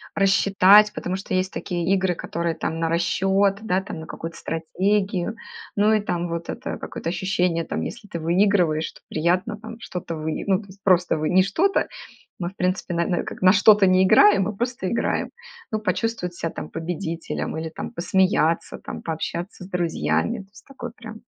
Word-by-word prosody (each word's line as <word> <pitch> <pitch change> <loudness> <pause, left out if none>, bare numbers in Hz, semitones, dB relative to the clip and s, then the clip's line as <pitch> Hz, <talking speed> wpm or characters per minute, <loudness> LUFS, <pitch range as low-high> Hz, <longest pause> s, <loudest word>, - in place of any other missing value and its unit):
рассчитать. 200 +1 +5
Потому 185 -3 -3
что, 190 0 -6
есть 185 0 +1
такие 175 0 -2
игры, 190 -2 +1
которые 170 0 -3
там 160 +1 -3
на 165 - +1
расчет, 195 +4 +2
да, 190 -3 +1
там, 185 -4 -7
на - - -8
какую-то 165 +1 -7
стратегию, 190 +4 -1 0.4
ну 210 +1 +4
и 215 - +4
там 175 -3 -2
вот 170 0 -4
это - - -4
какое-то 165 - -5
ощущение 180 -1 0
там, - - -3
если 235 -3 -6
ты 170 - -5
выигрываешь, 170 -2 +2
то - - -18
приятно 180 +7 0
там 225 +1 -9
что-то 180 -6 -5
выи 155 0 -3
Ну, 190 -2 +3
то 200 - -15
есть 195 +1 -16
просто 180 -3 +3
выи 155 0 -1
не 185 +1 +5
что-то, 355 - +1 0.5
мы, 175 -1 -2
в 195 - -18
принципе, 185 0 -1
на 170 0 0
на 175 - 0
как - - -8
на 185 - +7
что-то 205 -1 +6
не 185 0 +5
играем, 200 +1 +6
мы 210 +2 -3
просто 240 -3 -2
играем. 235 - -1 0.4
Ну, 215 - 0
почувствовать 215 -4 -2
себя 165 -1 -3
там - - -7
победителем 165 -1 -4
или 160 0 -4
там 160 - -7
посмеяться 175 -2 +1
там, - - -7
пообщаться 170 +4 -4
с - - -11
друзьями, 85 - 0
то 195 -1 -12
есть - - -17
такое 245 -4 -8
прям. 220 -1 -10
185 Hz, 190 wpm, -23 LUFS, 170-200 Hz, 0.5 s, на